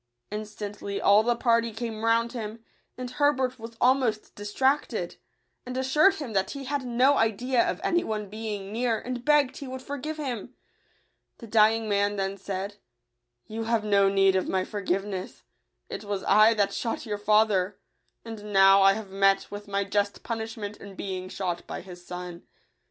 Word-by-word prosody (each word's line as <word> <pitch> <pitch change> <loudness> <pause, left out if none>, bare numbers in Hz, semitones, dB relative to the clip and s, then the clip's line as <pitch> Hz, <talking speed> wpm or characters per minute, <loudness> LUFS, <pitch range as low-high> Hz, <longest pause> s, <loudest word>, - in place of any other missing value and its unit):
Instantly 210 -1 -5
all 205 +1 +6
the 240 +2 +1
party 230 -1 +2
came 220 0 -5
round 230 +1 +2
him; 225 -1 -6 0.3
and 250 0 -4
Herbert 260 -2 +1
was 230 0 -9
almost 250 -4 +2
distracted, 260 +8 -1 0.5
and 250 0 -6
assured 300 +9 +4
him 280 - -6
that 190 -1 +1
he 280 -1 -6
had 280 +1 -2
no 255 +3 +3
idea 235 +3 +2
of - - -3
any 345 0 +2
one 215 -1 -3
being 210 -1 -5
near, 230 0 0
and 245 +1 -5
begged 290 -2 +3
he 280 - -7
would 260 0 -7
forgive 285 +3 -5
him. 250 -4 -5 0.8
The 235 - -10
dying 220 0 +3
man 205 0 +1
then 195 0 -2
said, 195 +1 -5 0.3
" - - -54 0.3
You 225 +1 -5
have 230 -1 +1
no 200 -2 +4
need 195 -1 +4
of 185 - 0
my 185 -1 0
forgiveness: 195 -1 -3 0.4
it - - -6
was 200 -2 -3
I 215 +3 +6
that 200 -2 +1
shot 230 0 -3
your 210 -2 -3
fa 210 +1 +5
ther; 195 -1 -1 0.5
and 210 -2 -8
now 195 0 +7
I 195 0 +7
have 210 -2 -7
met 195 0 +2
with 205 0 -7
my 200 0 0
just 200 +1 -1
pun 230 -1 -3
ishment 220 -2 -6
in 200 -1 -11
being 185 -1 -5
shot 180 -3 -4
by - - -5
his 180 -1 -12
son. 180 -1 -8
215 Hz, 180 wpm, -27 LUFS, 200-240 Hz, 0.8 s, now